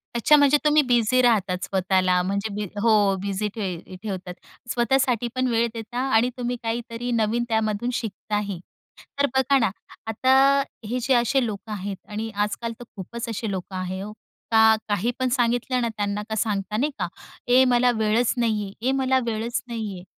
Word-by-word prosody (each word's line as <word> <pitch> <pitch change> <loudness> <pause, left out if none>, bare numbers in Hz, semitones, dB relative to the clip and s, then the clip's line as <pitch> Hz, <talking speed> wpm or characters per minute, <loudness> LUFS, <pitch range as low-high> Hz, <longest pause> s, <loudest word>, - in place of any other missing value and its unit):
अच्छा, 270 +6 +5
म्हणजे 285 0 +5
तुम्ही 300 0 +5
बिझी 245 +1 +3
राहतात 195 -6 +2
स्वतःला. 185 -1 +2
म्हणजे 200 +2 -2
बी 210 0 -2 0.2
हो, 230 -1 +4 0.3
बिझी 200 +1 -2
ठेव 185 -3 -5
ठेवतात. 185 -3 -5 0.4
स्वतःसाठी 245 -1 +1
पण 255 0 +1
वेळ 235 0 +2
देता 230 +2 -5 0.2
आणि 240 +3 +4
तुम्ही 245 0 -2
काहीतरी 230 +1 -3
नवीन 230 +1 +1
त्यामधून 220 +1 0
शिकताही. 205 -3 -3 0.6
तर 285 - +5
बघा 265 +1 +4
ना, 220 - +2 0.4
आता 260 +4 +2 0.5
हे 250 +2 -1
जे 260 +2 +2
असे 245 +2 +2
लोकं 215 0 -6
आहेत 200 -1 -4
आणि 220 +2 -4
आजकाल 230 +3 -3
तर - - -8
खूपच 235 +5 -6
असे 225 0 -3
लोकं 190 0 -5
आहे 185 +1 -4
ओ, 210 - -7 0.4
का 220 0 +6
काही 205 +4 +1
पण 255 -1 +1
सांगितलं 245 0 +1
ना 235 - +1
त्यांना 205 0 -2
का 220 - -2
सांगता 210 -1 -1
नाही 290 +5 +1
का, - - 0 0.4
"ए 255 +2 +6
मला 245 0 +4
वेळच 220 +2 +2
नाहीये, 215 -4 0 0.2
ए - - +3
मला 260 0 +3
वेळच 230 +1 -2
नाहीये." 215 -6 -5
225 Hz, 170 wpm, -24 LUFS, 205-245 Hz, 0.6 s, का